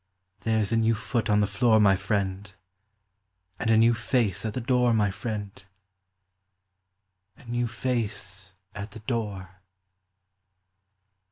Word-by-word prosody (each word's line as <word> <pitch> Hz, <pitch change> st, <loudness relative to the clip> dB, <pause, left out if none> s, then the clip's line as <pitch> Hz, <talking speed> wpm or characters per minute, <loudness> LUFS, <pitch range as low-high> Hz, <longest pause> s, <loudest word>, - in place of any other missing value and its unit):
There 110 Hz, +3 st, +1 dB
's -, -, -4 dB
a 115 Hz, -, +2 dB
new 115 Hz, 0 st, +3 dB
foot 110 Hz, +1 st, -2 dB
on 105 Hz, 0 st, +4 dB
the -, -, +3 dB
floor, 110 Hz, +1 st, +3 dB
my 100 Hz, -2 st, +5 dB
friend, 100 Hz, 0 st, -2 dB, 1.1 s
And 110 Hz, -, -1 dB
a 110 Hz, -, +5 dB
new 115 Hz, +1 st, +5 dB
face 120 Hz, -3 st, 0 dB
at 105 Hz, -, -5 dB
the -, -, -1 dB
door, 125 Hz, -1 st, +2 dB
my 105 Hz, -2 st, +2 dB
friend, 105 Hz, -2 st, -5 dB, 1.7 s
A -, -, -18 dB
new 120 Hz, 0 st, -1 dB
face 105 Hz, -6 st, -3 dB, 0.2 s
at 100 Hz, +1 st, -6 dB
the 110 Hz, -, -9 dB
door. 100 Hz, -5 st, -4 dB
110 Hz, 135 wpm, -26 LUFS, 100-115 Hz, 1.7 s, my